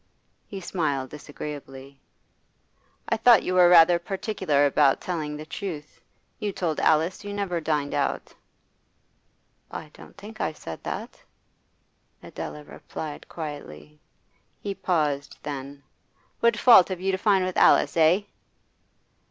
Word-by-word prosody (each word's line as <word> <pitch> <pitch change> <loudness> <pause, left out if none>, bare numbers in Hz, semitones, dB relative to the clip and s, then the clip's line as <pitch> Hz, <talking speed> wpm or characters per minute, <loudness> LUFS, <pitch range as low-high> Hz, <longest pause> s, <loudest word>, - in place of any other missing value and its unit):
He 195 - -7
smiled 145 -8 -2
disagreeably. 140 -2 -9 1.1
'I 225 - +1
thought 230 -1 +6
you 185 - -2
were 180 -1 +6
rather 170 0 +7
particular 185 -5 0
about 140 -1 +3
telling 155 -4 -4
the 155 - -8
truth. 160 -3 -7 0.4
You 210 -2 -2
told 170 -5 -2
Alice 160 +5 +2
you 205 0 -6
never 190 -4 -2
dined 150 -2 -1
out.' - - -2 1.4
'I 155 - -8
don't - - -15
think 215 +2 -10
I - - -1
said 80 - -9
that,' - - -6 1.0
Adela 150 - -7
replied 150 0 -8
quietly. 75 - -8 0.6
He 200 - -4
paused; 150 -7 -1
then: 140 0 -7 0.6
'What 235 -1 +3
fault 220 -6 +7
have 185 -2 -4
you 190 +1 0
to 190 - -1
find 195 -3 +3
with 185 - -4
Alice, - - +4
eh? 165 +4 +4
160 Hz, 125 wpm, -25 LUFS, 145-190 Hz, 1.4 s, rather